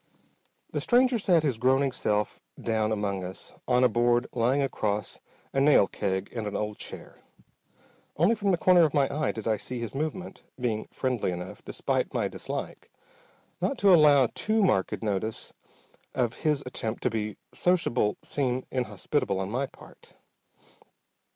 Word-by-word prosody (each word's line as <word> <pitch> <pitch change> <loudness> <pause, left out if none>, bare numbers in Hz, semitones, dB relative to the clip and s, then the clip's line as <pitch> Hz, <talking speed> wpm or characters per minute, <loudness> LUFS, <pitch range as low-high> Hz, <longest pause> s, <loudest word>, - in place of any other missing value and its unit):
The - - -2
stranger 250 0 +3
sat 175 -6 +3
his 130 -7 0
groaning 135 +2 +3
self 105 -4 -1 0.2
down 110 -1 0
among 100 -3 -1
us, 90 +1 -8
on 125 0 +3
a - - +7
board 120 +1 +2
lying 125 +4 +2
across 105 -6 -2 0.3
a 135 - +1
nail 140 -7 +6
keg 95 -1 -3
and 110 -3 -3
an 105 - -4
old 105 0 -3
chair. - - -8 1.0
Only 170 +9 +4
from 205 -3 -1
the 180 - +3
corner 180 +2 +5
of 155 -2 +3
my 140 -2 +4
eye 150 -2 0
did 110 -1 -6
I 110 -1 +2
see 125 +4 -5
his 115 -2 -5
movement, 155 +6 -4 0.2
being 115 -3 -2
friendly 125 -7 -1
enough, 90 +1 -7
despite - - -2
my - - +1
dislike, - - -6 0.7
not 190 +9 0
to 200 -3 +5
allow 145 -5 +7
too 215 0 +1
marked 95 - +1
notice 105 +1 -3 0.6
of 120 -3 +1
his 150 -3 +1
attempt 115 -3 -4
to 125 - +1
be 105 -2 -3 0.2
sociable 145 -12 +1
seem 130 -2 -1
inhospitable 110 -2 -1
on 95 +1 -3
my 130 +4 -1
part. - - -17
125 Hz, 155 wpm, -27 LUFS, 105-150 Hz, 1.0 s, a